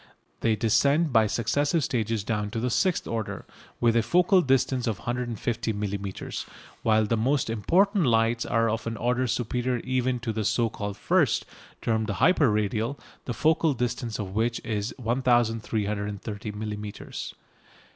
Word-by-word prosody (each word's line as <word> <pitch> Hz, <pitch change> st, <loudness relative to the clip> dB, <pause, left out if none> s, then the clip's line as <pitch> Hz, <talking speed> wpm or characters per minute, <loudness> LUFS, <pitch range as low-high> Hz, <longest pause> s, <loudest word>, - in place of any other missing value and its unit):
They 115 Hz, -1 st, +2 dB
descend 140 Hz, +7 st, +2 dB
by 110 Hz, -2 st, +5 dB
successive 145 Hz, -, +1 dB
stages 115 Hz, -4 st, -1 dB
down 105 Hz, -1 st, -2 dB
to 115 Hz, -, -3 dB
the 125 Hz, +2 st, -1 dB
sixth 185 Hz, +7 st, +1 dB
order, 115 Hz, -2 st, -4 dB, 0.3 s
with 115 Hz, -1 st, +3 dB
a 115 Hz, -, +5 dB
focal 180 Hz, -, +4 dB
distance 130 Hz, -3 st, +1 dB
of 110 Hz, -4 st, -1 dB
150 120 Hz, -1 st, -2 dB
millimetres, 100 Hz, -1 st, -4 dB, 0.3 s
while 110 Hz, -1 st, +3 dB
the 115 Hz, -, +1 dB
most 120 Hz, +1 st, +1 dB
important 185 Hz, -, +2 dB
lights 115 Hz, 0 st, +2 dB
are 115 Hz, +1 st, +1 dB
of 115 Hz, +1 st, -2 dB
an 115 Hz, -1 st, -3 dB
order 125 Hz, +2 st, 0 dB
superior 125 Hz, +2 st, -1 dB
even 130 Hz, -1 st, 0 dB
to 115 Hz, -2 st, -2 dB
the 110 Hz, 0 st, -2 dB
so 115 Hz, +2 st, +1 dB
called 105 Hz, 0 st, -5 dB
"first," -, -, +2 dB, 0.4 s
termed 110 Hz, -1 st, 0 dB
the 100 Hz, -, -2 dB
"hyper 160 Hz, -, +4 dB
radial," 110 Hz, +5 st, -1 dB, 0.3 s
the 120 Hz, -, -3 dB
focal 160 Hz, -1 st, +2 dB
distance 120 Hz, -1 st, -2 dB
of 95 Hz, -3 st, -5 dB
which 115 Hz, +3 st, 0 dB
is 105 Hz, 0 st, -2 dB
1330 110 Hz, -4 st, -1 dB
millimetres. 105 Hz, 0 st, -6 dB
115 Hz, 150 wpm, -26 LUFS, 110-125 Hz, 0.4 s, by